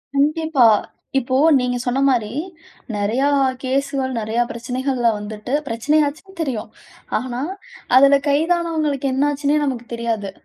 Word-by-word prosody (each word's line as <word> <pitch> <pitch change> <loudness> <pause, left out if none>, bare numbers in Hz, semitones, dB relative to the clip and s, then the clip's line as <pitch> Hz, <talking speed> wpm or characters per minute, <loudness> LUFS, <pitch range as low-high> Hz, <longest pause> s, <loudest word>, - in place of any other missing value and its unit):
கண்டிப்பா. 305 -1 +3 0.5
இப்போ 260 0 -2 0.2
நீங்க 250 0 -1
சொன்ன 250 +2 0
மாரி, 225 -4 0 0.6
நெறைய 215 +6 0 0.4
கேஸ்கள் 265 0 -1
நிறைய 220 +2 -2
பிரச்சனைகள்ல 250 +1 -1
வந்துட்டு 210 +4 -6
பிரச்சனை 240 +7 +1
ஆச்சுன்னு 345 +6 -7
தெரியும். 235 -7 -4 0.5
ஆனா 250 +1 -4 0.5
அதுல 275 +2 +7
கைதானவங்களுக்கு 310 -2 0
என்ன 270 +2 +1
ஆச்சுன்னே 290 +1 +1
நமக்கு 255 -4 -2
தெரியாது. 225 -4 -2
260 Hz, 115 wpm, -20 LUFS, 235-285 Hz, 0.6 s, அதுல